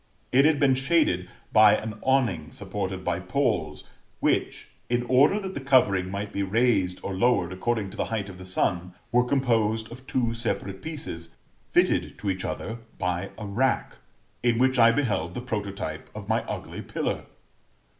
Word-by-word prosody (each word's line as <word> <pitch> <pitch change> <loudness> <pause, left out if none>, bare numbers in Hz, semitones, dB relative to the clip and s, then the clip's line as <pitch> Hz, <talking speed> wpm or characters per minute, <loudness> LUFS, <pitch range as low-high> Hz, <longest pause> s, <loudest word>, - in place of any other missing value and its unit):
It 135 +3 +5
had 155 -2 +4
been 140 -2 +5
shaded 135 - +1 0.2
by 110 -1 +7
an 110 0 -6
awning 115 - +1
supported 95 -1 -4
by 85 - -1
poles, 90 - -1 0.4
which, - - 0 0.2
in 120 0 +1
order 135 +11 +4
that 190 -2 -5
the - - -4
covering 100 -9 +3
might 100 +2 -4
be 100 - -1
raised 100 -3 +2
or 100 - -3
lowered 95 -4 +2
according 105 +1 -1
to - - -11
the - - 0
height 110 -3 -3
of 95 -2 -10
the 95 - -9
sun, 90 -1 -1 0.2
were 125 +1 +4
composed 115 -4 +1
of 130 +2 -11
two 120 -3 0
separate 100 -4 -3
pieces, 85 - -5 0.3
fitted - - +2
to 100 - -1
each 95 0 -4
other 115 +2 -4 0.2
by 90 +2 -2
a 110 - -6
rack, 120 +6 0 0.4
in 120 -1 +2
which 130 +1 +3
I 115 0 +8
beheld 105 -9 -1
the - - -2
prototype 100 -9 -4
of - - -7
my - - +2
ugly - - -6
pillar. - - -3
110 Hz, 170 wpm, -26 LUFS, 95-125 Hz, 0.4 s, I